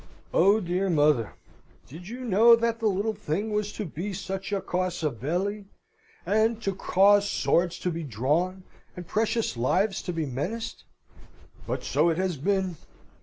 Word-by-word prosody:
Oh, 200 +5 +5
dear 185 0 -1
mother! 145 -8 +2 0.5
did 165 +7 -11
you 245 +4 -7
know 230 0 +6
that 230 0 -1
the 225 - +1
little 205 +2 0
thing 205 +4 -3
was 210 0 -1
to 210 - -4
be 180 +5 -5
such 190 +2 -5
a 200 - +1
causa 180 -5 -2
belli, 180 - -3 0.6
and 220 +2 +2
to 195 - 0
cause 200 +2 +4
swords 175 -2 +1
to 180 - -2
be 165 0 -4
drawn, 155 - -1 0.3
and 180 - -7
precious 225 - 0
lives 190 - +1
to - - -4
be 165 -2 -2
menaced? 150 - -4 0.8
But - - -3
so 150 +5 +2
it 165 - 0
has 185 -3 -1
been. 190 +2 0
190 Hz, 160 wpm, -26 LUFS, 165-210 Hz, 0.8 s, know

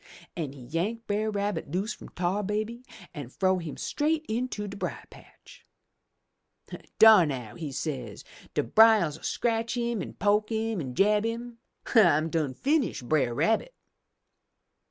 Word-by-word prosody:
"An' 155 -6 -4
he 140 - -12
yank 185 - -3
Brer 210 +1 -1
Rabbit 205 -5 -2
loose 190 +8 -2
from - - -12
Tar 180 +3 -1
Baby 215 +4 -3 0.3
an' 145 -7 -7
frow 185 +5 +1
him 165 -4 -7
straight 310 +1 -1
into 220 -2 -3
de 200 - -7
brier 200 - -5
patch. - - -17 1.3
'Dar 215 -6 +8
now,' 125 -6 -5
he 155 -4 -6
say, 130 -7 -4 0.4
*De - - +2
briers 215 - +5
'11 - - -20
scratch 230 0 -1
'im, 235 -3 -1
an' - - -7
poke 210 +3 +1
'im, 220 -3 -1
an' 130 -3 -6
jab 210 +4 +3
'im! 230 +1 -5 0.3
I 175 - +6
done 155 -4 -2
finish 280 - 0
Brer 125 -3 +1
Rabbit!' 225 - 0
205 Hz, 150 wpm, -27 LUFS, 155-225 Hz, 1.3 s, Dar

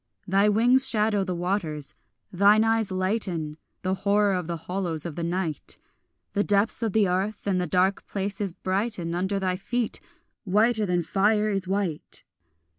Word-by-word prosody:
Thy 195 +3 +4
wings 245 +5 +4
shadow 210 -2 +2
the 185 -2 -3
waters; 170 -5 -2 0.4
thine 205 +4 +5
eyes 225 -2 +1
lighten 185 -5 -1 0.3
The 185 0 0
horror 200 +1 +2
of 180 -3 -2
the 170 -1 -3
hollows 175 -4 -2
of 165 -4 -5
the 170 - -4
night; 170 -3 -2 0.6
The 205 - +2
depths 205 +3 +1
of 225 -4 -1
the 215 -3 +4
earth 190 +4 -1
and 190 -3 +1
the 180 - -2
dark 185 +3 +1
places 200 0 -2
brighten 185 -1 -2
Under 190 +3 -1
thy 185 -1 -1
feet, 240 +4 -2 0.4
whiter 215 +2 +2
than 175 -1 +1
fire 210 +4 +2
is 195 -2 -1
white. 190 -5 -2
195 Hz, 160 wpm, -26 LUFS, 180-210 Hz, 0.6 s, thine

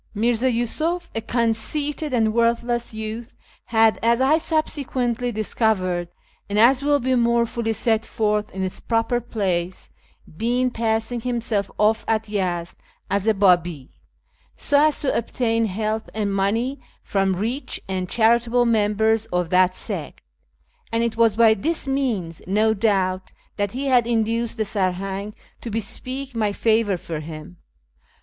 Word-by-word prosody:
Mirza 235 +4 +2
Yusuf, 315 +9 -1
a 225 - -2
conceited 245 +7 -1
and 220 -3 +2
worthless 235 +1 +1
youth, 220 +2 -6 0.3
had, 225 -1 +3
as 235 +1 +3
I 280 +5 +4
subsequently 255 -7 -1
dis 215 -1 -4
covered, 185 -6 +1 0.4
and 205 - -1
as 250 +5 +5
will 290 0 +2
be 260 0 0
more 235 -1 +3
fully 230 -1 -2
set 225 0 +1
forth 210 -2 -1
in 190 0 -4
its 185 - -4
proper 235 +1 0
place, 185 -6 -3 0.3
been 245 +9 -1
passing 225 +1 -1
himself 230 -5 -1
off 220 +1 +2
at 220 0 0
Yezd 180 -5 -2 0.3
as 200 +1 0
a 220 - +4
Babi, 175 -7 +2 0.6
so 290 +1 +3
as 305 - 0
to 280 - 0
obtain 230 -1 0
help 215 +2 -2
and 205 -2 -1
money 225 +8 0 0.2
from 195 -2 0
rich 230 +9 -3
and 185 -1 -3
charitable 235 +1 +3
members 220 0 +2
of 180 -2 -1
that 185 0 +4
sect; - - -6 0.7
and 230 0 +1
it 230 -1 -1
was 225 -2 +3
by 225 -1 +6
this 310 +8 -2
means, 230 - -1
no 215 +3 +3
doubt, 190 -3 0 0.3
that 205 -1 -1
he 265 +3 -3
had 250 -3 +3
induced, 230 0 0
the 220 - 0
Sarhang 195 +1 -2 0.3
to 235 - -6
bespeak 255 +5 -4
my 215 -3 0
favour 220 -2 +1
for 165 -2 -6
him. 155 +2 -9
225 Hz, 145 wpm, -22 LUFS, 200-240 Hz, 0.7 s, by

